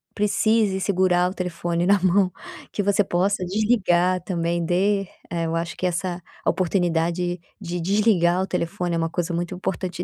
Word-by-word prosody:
precise 210 -1 +2
segurar 180 -2 +2
o - - -7
telefone 175 -1 -2
na 200 0 +4
mão, 185 0 +3 0.4
que - - -1
você 200 +1 +3
possa 185 +1 0
desligar 185 -3 +2
também. 170 -2 -1
Dê 195 +4 +2 0.3
eh, 170 -1 -2
eu 165 - -2
acho 165 0 -3
que 185 - -2
essa 180 0 -2 0.2
oportunidade 175 -1 0 0.2
de 175 -2 -4
desligar 185 -2 +3
o 190 - -2
telefone 170 0 -2
é - - 0
uma 165 0 0
coisa 175 0 -2
muito 175 +1 -2
importante. 180 -1 -3
180 Hz, 160 wpm, -23 LUFS, 175-195 Hz, 0.4 s, na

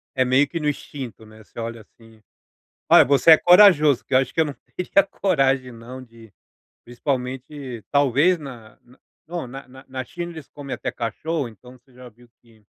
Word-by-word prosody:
É 130 - +2
meio 130 +3 +3
que 170 - -4
no 150 -2 -2
instinto, 130 -6 -6
né, 110 0 -16
você - - -17
olha 115 -1 -6
assim 115 +1 -21 0.7
Olha, - - +8
você 140 +4 +4
é 155 - +9
corajoso 175 - +5
que - - -7
eu 130 - +6
acho 130 - -3
que - - -3
eu 160 - +4
não 145 - -6 0.2
teria 185 +2 +2
coragem 135 -10 0
não, 120 +3 -10
de, 115 -3 -16 0.5
principalmente, 130 0 -5
talvez, 145 +6 +3
na 125 -7 -12
na 125 +2 -22 0.3
não, 170 -4 -5
na 135 +3 -10
na 130 +1 -15
na 130 -1 -5
China 175 +5 -7
eles 160 -4 -11
comem 140 -2 -7
até - - -4
cachorro, 135 +4 -3
então 125 +3 -16
você 130 +1 -29
já 125 0 -12
viu 120 +2 -22
que 115 -2 -24
130 Hz, 195 wpm, -22 LUFS, 120-150 Hz, 0.7 s, é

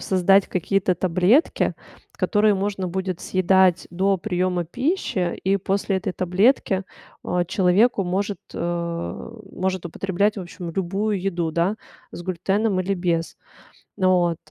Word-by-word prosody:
создать 195 +1 +3
какие-то 185 +1 0
таблетки, 185 - +2 0.4
которые 210 -1 +2
можно 195 -1 -2
будет 185 0 -3
съедать 185 -1 +3
до 190 +2 +1
приёма 180 0 -1
пищи, 245 - -1
и 195 +1 +2
после 195 0 -1
этой 190 -1 -3
таблетки, 190 +1 +2 0.4
а, 180 0 0
человеку 190 +4 +2
может 195 +3 -2 0.2
э, 170 +2 -3 0.2
может 185 -1 -2
употреблять, 195 +4 0
в - - -4
общем, 175 0 -7
любую 195 +3 -1
еду, 175 -3 -1
да. 170 +6 0 0.4
С 175 - -7
глютеном 190 +3 0
или 195 +2 -1
без. 170 -2 -1 0.6
Вот. 180 -3 +2
185 Hz, 125 wpm, -23 LUFS, 175-195 Hz, 0.6 s, создать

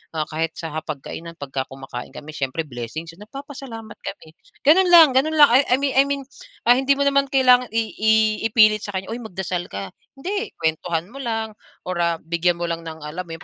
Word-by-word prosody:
ah, 155 - 0
kahit 160 +1 -2
sa 165 -2 -6
hapagkainan 155 +2 -6
pag 145 -4 -9 0.2
kumakain 135 -1 -9
kami 150 +1 -9
siyempre 140 +2 -3
blessings 145 +4 -7
yun, 165 - -19
nagpapasalamat 250 -5 -9
kami, 160 -5 -8 0.3
gano'n 360 +6 +6
lang, 335 -5 +8
gano'n 275 +5 +2
lang. 295 -2 +8
I 250 0 +4
mean 275 +1 0
I 275 - +5
mean, 280 -1 -2 0.4
ah, 245 +2 +5
hindi 275 +1 +3
mo 280 - 0
naman 275 0 +3
kailangan 255 -2 +4
i 230 - +3 0.2
i 220 +1 +3 0.4
ipilit 215 -1 +5
sa 205 -1 -7
kanya, 190 +2 -4
"Uy 235 - -4
magdasal 185 -5 -4
ka." 100 0 -6 0.2
Hindi, 400 +10 -4
kuwentuhan 165 +3 -2
mo 275 - -10
lang, 225 -4 -3 0.3
or, 180 -1 -4
ah, 170 -1 +2
bigyan 170 +2 +1
mo 170 - -5
lang 170 -1 -2
ng 160 -1 -8
alam 170 +4 -6
mo - - -10
yung 165 - -13
200 Hz, 205 wpm, -22 LUFS, 160-270 Hz, 0.4 s, lang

